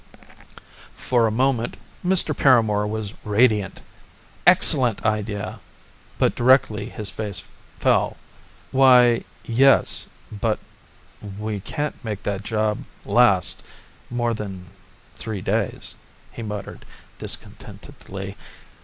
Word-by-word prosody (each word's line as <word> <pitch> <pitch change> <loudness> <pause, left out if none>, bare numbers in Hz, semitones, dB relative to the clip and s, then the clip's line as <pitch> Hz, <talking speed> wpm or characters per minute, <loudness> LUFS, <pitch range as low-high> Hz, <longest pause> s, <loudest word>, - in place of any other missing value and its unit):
For 120 -3 +1
a - - -1
moment 125 0 0 0.3
Mr. 180 -4 +2
Paramor 110 -6 +3
was 105 -1 -4
radiant. 105 -2 +1 0.6
"Excellent 120 -6 +6
idea!" 105 0 -2 0.6
but - - +2
directly 120 -4 +3
his 105 -5 -5
face 100 -5 -4 0.4
fell. - - +2 0.5
"Why... 125 -3 +5 0.2
Yes! 135 +4 +3 0.2
But 110 +1 -1 0.8
we 105 -1 -4
can't 145 +9 -5
make 105 -3 -5
that 100 -1 -2
job 105 0 -1 0.3
last - - +3 0.5
more 120 -1 -1
than 95 -4 -6 0.5
three 110 -3 -5
days," 100 +1 -2 0.4
he - - -9
muttered 105 -2 -7 0.4
discontentedly. 95 +1 -7
110 Hz, 95 wpm, -22 LUFS, 105-120 Hz, 0.8 s, Excellent